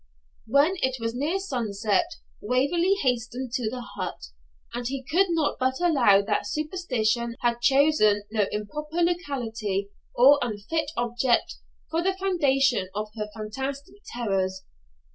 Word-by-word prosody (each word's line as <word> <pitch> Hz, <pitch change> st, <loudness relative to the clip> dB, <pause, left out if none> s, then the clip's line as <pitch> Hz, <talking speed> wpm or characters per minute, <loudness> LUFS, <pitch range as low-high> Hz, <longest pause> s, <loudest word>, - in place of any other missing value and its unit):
When 285 Hz, +10 st, +3 dB
it 260 Hz, -5 st, -1 dB
was 230 Hz, 0 st, -2 dB
near 295 Hz, +9 st, -1 dB
sunset 220 Hz, -, -1 dB, 0.3 s
Waverley 285 Hz, -, +2 dB
hastened 250 Hz, 0 st, -1 dB
to 240 Hz, -3 st, -1 dB
the 250 Hz, +2 st, -5 dB
hut; 240 Hz, -, -6 dB, 0.4 s
and 240 Hz, 0 st, -3 dB
he 265 Hz, +1 st, -4 dB
could 355 Hz, +9 st, +2 dB
not 325 Hz, -3 st, 0 dB
but 260 Hz, 0 st, 0 dB
allow 255 Hz, -, +4 dB
that 205 Hz, 0 st, -1 dB
superstition 245 Hz, -, -1 dB
had 240 Hz, 0 st, 0 dB
chosen 270 Hz, -7 st, +4 dB
no 210 Hz, -3 st, +1 dB
improper 300 Hz, +11 st, -3 dB
locality, 230 Hz, -, -2 dB, 0.2 s
or 275 Hz, +4 st, +7 dB
unfit 245 Hz, +8 st, -2 dB
object, 240 Hz, +1 st, +1 dB, 0.3 s
for 325 Hz, +1 st, +1 dB
the 380 Hz, +2 st, 0 dB
foundation 275 Hz, -, +2 dB
of 210 Hz, +1 st, -3 dB
her 210 Hz, -1 st, -4 dB
fantastic 265 Hz, -, -5 dB
terrors. 190 Hz, -5 st, -1 dB
250 Hz, 130 wpm, -26 LUFS, 220-300 Hz, 0.4 s, or